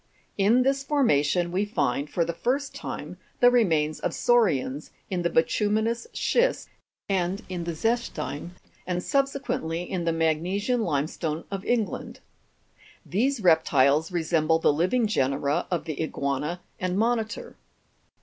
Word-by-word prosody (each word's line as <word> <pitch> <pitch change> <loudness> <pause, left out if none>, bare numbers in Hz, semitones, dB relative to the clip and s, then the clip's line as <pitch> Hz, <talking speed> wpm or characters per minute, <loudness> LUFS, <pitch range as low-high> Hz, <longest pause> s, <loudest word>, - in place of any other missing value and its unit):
In 220 +6 +4
this 270 +1 +1
formation 175 - +2
we 190 +3 +1
find 140 - -1
for 170 +1 0
the 170 - -3
first 265 +9 -1
time - - -6 0.2
the 245 0 +6
remains 160 -11 +2
of - - -2
sau'rians, 160 - +1 0.2
in 180 -2 0
the 170 - +1
bituminous 215 - +1
schist - - +1 0.4
and 190 +2 -1
in 175 -2 -4
the 170 - -2
zechstein, 225 -7 -2 0.4
and 180 0 -1
subsequently 275 - -1
in 180 -1 -3
the 165 - +2
magnesian 175 +9 0
limestone 155 -2 -2
of 195 -1 -4
England. 230 -4 -2 0.9
These 245 +5 0
reptiles 160 -2 +4
resemble 160 -2 +2
the 165 - +3
living 185 +10 +1
genera 140 -4 0
of 175 -3 -2
the 155 -2 -4
iguana 150 +2 -2 0.2
and 185 0 -1
monitor. 225 0 -1
180 Hz, 130 wpm, -26 LUFS, 160-225 Hz, 0.9 s, the